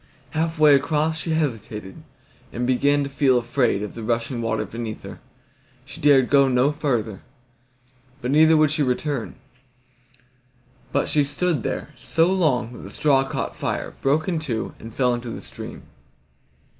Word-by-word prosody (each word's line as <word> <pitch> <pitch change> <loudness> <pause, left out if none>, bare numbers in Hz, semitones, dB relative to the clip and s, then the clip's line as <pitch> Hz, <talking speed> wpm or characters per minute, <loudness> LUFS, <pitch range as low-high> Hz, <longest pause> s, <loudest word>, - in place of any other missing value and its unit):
Half 160 +1 -1
way 155 -1 +6
across 150 +3 +2
she 160 0 -2
hesitated, 110 - -4 0.5
and 120 +1 -2
began 140 +3 +2
to 140 - -4
feel 135 -2 +3
afraid 120 -3 0
of 105 - -6
the 115 - -7
rushing 115 +2 -2
water 110 -1 -1
beneath 115 +1 -6
her. - - -9 0.7
She - - -11
dared 140 -3 +4
go 140 -1 +6
no 130 +2 +3
farther, 120 -9 -2 1.0
but 125 0 -3
neither 160 +2 +6
would 155 -1 +4
she 155 - 0
return; 135 -1 -1 1.6
but - - +1
she 150 - +2
stood 155 0 -1
there - - -4
so 165 +3 +1
long 130 -11 +1
that - - -10
the - - -9
straw 140 -3 +2
caught 135 - -4
fire, - - -3
broke 145 +4 +1
in 170 -4 0
two, 120 -8 -3
and 115 - -9
fell 125 +1 +1
into 120 0 -4
the - - -6
stream. - - -9
135 Hz, 160 wpm, -23 LUFS, 120-150 Hz, 1.6 s, way